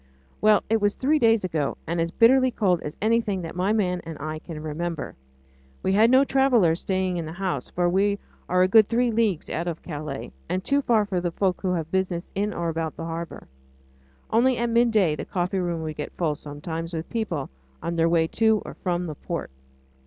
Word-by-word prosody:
Well! 215 -1 +5
it 225 0 +1
was 205 0 +2
three 300 +4 +2
days 225 -4 +4
ago, 160 -6 -1
and 165 +1 -1
as 165 - 0
bitterly 255 +7 +5
cold 190 -8 +1
as 150 - -6
anything 220 -4 +1
that 165 - -7
my 185 +3 +1
man 180 -5 +1
and 165 -2 -7
I 155 +1 -4
can 160 -1 -8
remember. 160 +1 -4 0.7
We 190 - +1
had 220 +3 +5
no 260 +2 +6
travellers 245 -12 +3
staying 185 -2 -1
in 170 - -3
the - - -6
house, 185 0 -3
for 175 0 0
we 200 +3 +2 0.3
are 180 0 +4
a - - +4
good 215 +2 +6
three 240 +1 +2
leagues 215 -7 0
out 170 +2 -2
of 165 -2 -4
Calais, 150 -4 -6 0.2
and 185 0 -1
too 280 +5 +2
far 225 -5 +2
for 185 -3 -2
the 175 - 0
folk 185 +1 -1
who 185 -2 0
have 165 -2 -3
business 185 -2 -1
in 205 +2 -1
or 170 -4 -3
about 160 -1 -3
the 165 - -5
harbour. 165 0 -6 0.8
Only 245 +2 +3
at 235 0 0
midday 225 -9 +3
the - - -5
coffee 185 +1 -1
room 170 -3 -2
would 155 -1 -5
get 150 - -5
full 160 -4 +1
sometimes 160 +3 -6
with 160 0 -4
people 195 - -2 0.3
on 170 - -2
their 165 0 +3
way 165 -1 +3
to 220 +5 +2
or - - -7
from 180 -1 -2
the 155 - -4
port. 140 - -5
180 Hz, 210 wpm, -25 LUFS, 165-220 Hz, 0.8 s, no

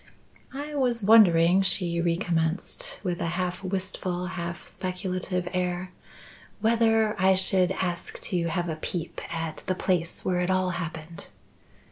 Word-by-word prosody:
"I 295 +2 -5
was 245 -6 +1
wondering," 185 -4 +6
she 175 -3 0
recommenced, 175 - -1
with 180 -3 -2
a - - 0
half 180 +1 -2
wistful, 185 -1 -2
half 170 -1 -5
speculative 185 -1 -3
air, 180 0 -2 0.7
"whether 225 -1 +3
I 190 0 +5
should 185 -1 +4
ask 175 -2 -3
to 175 -2 -1
have 175 +2 -1
a 160 -2 -3
peep 165 +1 -4
at 165 -1 -3
the 185 - +1
place 180 -3 -1
where 180 -1 +1
it 180 - 0
all 185 -1 +2
happened." 170 -1 -6
180 Hz, 135 wpm, -27 LUFS, 170-190 Hz, 0.7 s, wondering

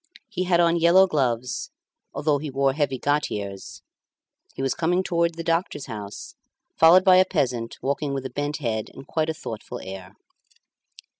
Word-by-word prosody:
He 185 -4 -2
had 175 -1 +3
on 170 0 +4
yellow 175 +3 +6
gloves, 125 -7 -1 0.4
although 145 0 0
he 150 +1 -5
wore 135 0 +1
heavy 140 -2 -1
gaiters; 105 -10 -3 0.7
he 135 - -4
was 135 - +1
coming 175 +3 +1
towards 170 -2 0
the 165 - -4
doctor's 165 -3 -1
house, 105 -4 -8 0.4
followed 170 +3 +7
by 185 -1 +6
a 185 - +7
peasant 130 -10 -2
walking 140 +1 -1
with 135 -1 -3
a - - -5
bent 145 +1 -2
head 110 -6 -3
and 135 - -10
quite 160 -1 -1
a - - 0
thoughtful 110 -7 -7
air. 95 0 -9
145 Hz, 165 wpm, -24 LUFS, 125-170 Hz, 0.7 s, followed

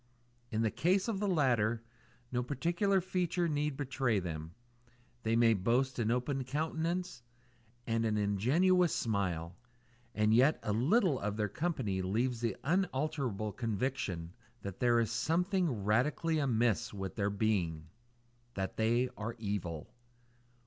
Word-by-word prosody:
In 110 0 0
the 110 - +1
case 185 +5 +2
of 215 -4 -1
the 205 - 0
latter, 120 - +2 0.5
no 125 -1 0
particular 170 - +1
feature 175 -1 0
need 150 -2 -1
betray 130 -5 0
them; 80 -2 -6 0.7
they 115 0 +1
may 115 -1 +5
boast 120 +7 +1
an 110 -2 +1
open 125 +3 0
countenance 160 +4 -2 0.6
and 115 0 0
an 110 -1 +1
ingenuous 145 - +3
smile; 90 -6 -1 0.6
and 105 0 +3
yet 130 +7 +5
a 105 - 0
little 150 - +3
of 105 +1 -3
their 105 -1 +1
company 125 - -1
leaves 115 +6 0
the 115 -4 -1
unalterable 140 - -1
conviction 105 -6 -2 0.3
that 100 -2 -6
there 120 -1 +4
is 115 -1 0
something 175 - +1
radically 150 +9 +1
amiss 120 -4 +1
with 95 -2 -5
their 100 -1 0
being: 100 -7 0 0.7
that 95 -1 -3
they 120 +3 +2
are 110 +2 -4
evil. 100 -7 -4
120 Hz, 135 wpm, -33 LUFS, 105-150 Hz, 0.7 s, may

